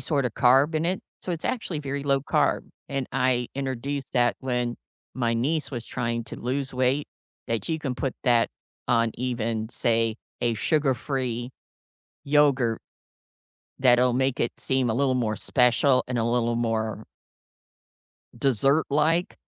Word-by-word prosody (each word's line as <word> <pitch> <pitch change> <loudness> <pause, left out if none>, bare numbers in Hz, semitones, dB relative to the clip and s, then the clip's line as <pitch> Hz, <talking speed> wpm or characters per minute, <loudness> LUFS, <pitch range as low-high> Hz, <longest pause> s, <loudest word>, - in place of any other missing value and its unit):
sorta 140 -6 0
carb 135 +7 +4
in 160 +2 +1
it, 185 +2 0 0.2
so 185 - -5
it's 165 - -5
actually 205 -10 -2
very 140 0 -4
low-carb, 140 -1 +1 0.3
and 135 -2 -2
I 125 -1 +1
introduced 135 0 -3
that 120 -1 +3
when 125 -2 -1 0.4
my 120 -2 0
niece 150 +7 0
was 120 -4 -5
trying 115 -2 -2
to - - -9
lose 135 +2 -2
weight, 130 +3 +1 0.4
that 115 +5 -2
you 160 - 0
can 135 -5 -3
put 125 +1 -2
that 120 -2 +4 0.4
on 115 -1 +3
even, 115 -3 -2
say, 115 -2 +1 0.2
a 120 -1 +1
sugar-free 130 -3 -1 0.7
yogurt 140 -6 +3 1.0
that'll 125 -1 +5
make 130 +1 0
it 120 - 0
seem 130 -3 0
a - - 0
little 130 +1 +2
more 110 -4 0
special 125 +3 +3
and 125 -1 -1
a 115 - +1
little 120 0 +1
more 110 -2 -2 1.3
dessert-like 150 - +2
125 Hz, 140 wpm, -26 LUFS, 120-140 Hz, 1.3 s, that'll